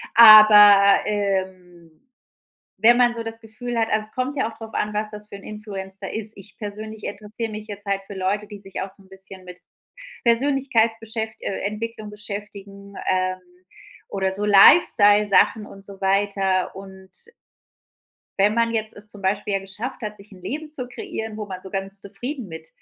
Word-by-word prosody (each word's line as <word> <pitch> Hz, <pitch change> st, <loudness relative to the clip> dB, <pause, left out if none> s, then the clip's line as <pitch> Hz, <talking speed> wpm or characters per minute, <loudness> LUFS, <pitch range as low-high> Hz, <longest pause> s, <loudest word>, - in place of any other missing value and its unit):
Aber, 210 Hz, -3 st, +9 dB
ähm, 190 Hz, -4 st, -3 dB, 0.9 s
wenn 240 Hz, +1 st, +7 dB
man 240 Hz, -1 st, +3 dB
so 230 Hz, -, -4 dB
das 225 Hz, 0 st, -5 dB
Gefühl 235 Hz, +2 st, -5 dB
hat 225 Hz, 0 st, +1 dB
also 215 Hz, -, +2 dB
es -, -, -31 dB
kommt 255 Hz, +3 st, -3 dB
ja 230 Hz, -4 st, -1 dB
auch -, -, -19 dB
drauf 225 Hz, -1 st, -10 dB
an, 210 Hz, -, -1 dB
was 210 Hz, +1 st, -2 dB
das 210 Hz, 0 st, -10 dB
für 200 Hz, -, -9 dB
'n 200 Hz, -, -15 dB
Influencer 195 Hz, -2 st, -7 dB
ist. 220 Hz, 0 st, -1 dB
Ich 200 Hz, +1 st, -14 dB
persönlich 215 Hz, 0 st, -8 dB
interessiere 215 Hz, +2 st, -6 dB
mich 215 Hz, +1 st, -8 dB
jetzt 205 Hz, 0 st, -7 dB
halt 195 Hz, 0 st, -1 dB
für 200 Hz, -, -8 dB
Leute, 200 Hz, +2 st, -2 dB
die 205 Hz, -1 st, -10 dB
sich 195 Hz, -1 st, -8 dB
auch 190 Hz, -, -6 dB
so 195 Hz, 0 st, -11 dB
'n -, -, -23 dB
bisschen 190 Hz, -1 st, -11 dB
mit 180 Hz, -1 st, -12 dB, 0.7 s
Persönlichkeitsbeschäf 230 Hz, -3 st, +1 dB
äh, 195 Hz, -, -4 dB
Entwicklung 215 Hz, 0 st, -6 dB
beschäftigen, 200 Hz, -1 st, -9 dB, 0.2 s
ähm, 185 Hz, 0 st, 0 dB, 0.7 s
oder 190 Hz, -1 st, -2 dB
so 205 Hz, +2 st, -2 dB
Lifestyle-Sachen 205 Hz, -, +5 dB
und 195 Hz, 0 st, -13 dB
so 195 Hz, -1 st, -10 dB
weiter 195 Hz, -1 st, 0 dB
und 190 Hz, -1 st, -12 dB, 1.3 s
Wenn 210 Hz, +3 st, +3 dB
man 230 Hz, 0 st, +1 dB
jetzt 220 Hz, -1 st, -2 dB
es 205 Hz, +1 st, -6 dB
zum 205 Hz, -1 st, -9 dB
Beispiel 195 Hz, +2 st, -1 dB
ja 195 Hz, -, +1 dB
geschafft 210 Hz, +7 st, -6 dB
hat, 210 Hz, -1 st, -5 dB
sich 200 Hz, +1 st, -18 dB
'n 185 Hz, -, -15 dB
Leben 295 Hz, -, -6 dB
zu 260 Hz, -5 st, -6 dB
kreieren, 220 Hz, -3 st, -7 dB
wo 210 Hz, -, -5 dB
man 185 Hz, -2 st, -8 dB
so 190 Hz, -, -10 dB
ganz 195 Hz, +1 st, -2 dB
zufrieden 240 Hz, +5 st, -6 dB
mit 160 Hz, -1 st, -9 dB
205 Hz, 180 wpm, -22 LUFS, 195-220 Hz, 1.3 s, Aber